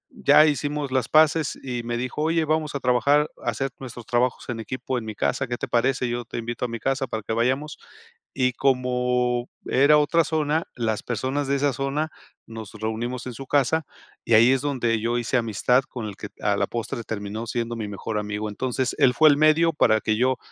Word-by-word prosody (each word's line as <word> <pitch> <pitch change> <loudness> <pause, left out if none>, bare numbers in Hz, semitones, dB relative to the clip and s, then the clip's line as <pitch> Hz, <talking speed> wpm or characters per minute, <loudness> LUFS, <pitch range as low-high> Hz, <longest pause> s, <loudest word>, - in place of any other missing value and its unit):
ya 155 - +6
hicimos 145 -1 -1
las 130 -3 0
paces 155 -1 +3
y 125 -2 -3
me 120 0 -3
dijo: 125 +4 -3
"Oye, 165 0 +1
vamos 155 -1 -1
a 140 - -1
trabajar, 140 +4 +3
hacer 120 +3 -2
nuestros 120 -3 -9
trabajos 120 0 0
en 115 -1 -3
equipo 130 +2 -4
en 110 - -9
mi 110 -1 -6
casa, 130 +5 -1
¿qué 120 0 -3
te - - -4
parece? 125 +1 +1
Yo 120 0 -2
te - - -7
invito 120 +1 -4
a - - -2
mi 115 -1 -5
casa 135 +3 -1
para 110 -3 -4
que 110 - -3
vayamos". 130 +6 -1 0.6
Y 130 -1 +1
como 125 -2 0 0.2
era 145 +3 +5
otra 155 +2 +3
zona, 155 0 0
las 110 -3 -1
personas 130 +5 -2
de 140 - +2
esa 145 0 +1
zona 140 +3 -1 0.4
nos 110 -2 -9
reunimos 115 +4 -4
en 125 - -5
su 135 +2 -8
casa 145 +3 +2 0.4
y - - -2
ahí 115 +3 +7
es 135 - +2
donde 120 -6 0
yo 120 +2 0
hice 120 +2 -1
amistad 120 +3 +2
con 120 -4 -6
el 100 - -7
que 105 - -7
a 105 -1 +1
la - - +1
postre 115 +1 -4
terminó 110 +1 -5
siendo 115 +1 -3
mi 110 -2 -4
mejor 105 +2 -4
amigo. 105 +1 -3
Entonces, 130 +3 -2
él 125 - +5
fue 155 +5 +6
el 140 - +4
medio 155 +2 +4
para 110 -6 +3
que 110 0 0
yo 130 +2 +1
125 Hz, 210 wpm, -24 LUFS, 115-140 Hz, 0.6 s, ahí